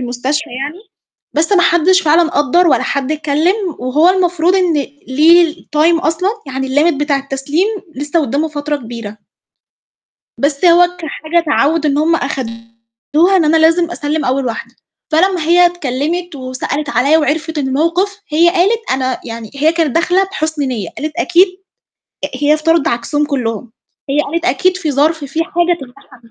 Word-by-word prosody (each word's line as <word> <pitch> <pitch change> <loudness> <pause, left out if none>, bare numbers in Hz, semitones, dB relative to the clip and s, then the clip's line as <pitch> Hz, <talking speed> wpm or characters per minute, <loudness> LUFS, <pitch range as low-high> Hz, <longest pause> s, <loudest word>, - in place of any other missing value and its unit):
المستشفى 255 +5 -3
يعني، 275 +8 -5 0.5
بس 325 +6 0
ما 360 - +4
حدّش 345 +3 +3
فعلًا 320 +2 +3
قدَّر 345 +2 +2
ولا 260 -6 +2
حد 280 +1 -2
اتكلِّم 310 +4 +1 0.2
وهو 275 +7 +2
المفروض 355 -1 +2
إن 365 -3 +2 0.4
ليه 320 +4 +4
الtime 325 0 +1
أصلًا، 330 +4 0 0.2
يعني 265 0 -4
الlimit 295 +5 +2
بتاع 290 0 0
التسليم 275 +6 -2 0.3
لسّه 295 +4 -1
قُدّامه 290 +3 -1
فترة 295 0 -3
كبيرة. 230 -5 -8 1.2
بس 280 +2 -1
هو 355 +1 +5
كحاجة 325 0 -2
تعوِّد 300 +1 +1
إن 285 -1 +1
هُم 325 +2 +2
آخَدوها 230 +6 -2
إن 350 - +2
أنا 310 +2 +3
لازم 330 +2 +3
أسلِّم 300 -2 -2
أول 260 +1 0
واحدة، 230 -2 -5 0.4
فلمّا 360 +1 +2
هي 350 +2 +5
اتكلِّمت 345 +1 -3
وسألت 265 +3 -4
عليَّ 280 +5 +3
وعِرفِت 320 +1 -1
الموقِف، 335 +9 -1
هي 325 +3 +3
قالت 395 +6 0
أنا 260 -1 -1
يعني 230 -2 -8
هي 305 +3 +2
كانت 330 -3 0
داخلة 360 +3 +2
بحُسن 315 -6 -3
نِيَّة، 235 -10 -3
قالت 305 +1 -4
أكيد 360 +3 +4 0.8
آآ، 290 - -3
هي 290 +3 +2
افتَرضِت 325 0 +1
عكسهم 265 +6 -1
كُلّهم، 235 -5 -3 0.4
هي 290 +2 +2
قالت 335 +4 -3
أكيد 370 0 +1
في 325 -5 -2
ظَرف، 300 +2 +1
في 315 +4 -2
حاجة 345 -1 0
تمنعها 255 -1 -14
من 230 - -21
305 Hz, 155 wpm, -15 LUFS, 275-340 Hz, 1.2 s, هو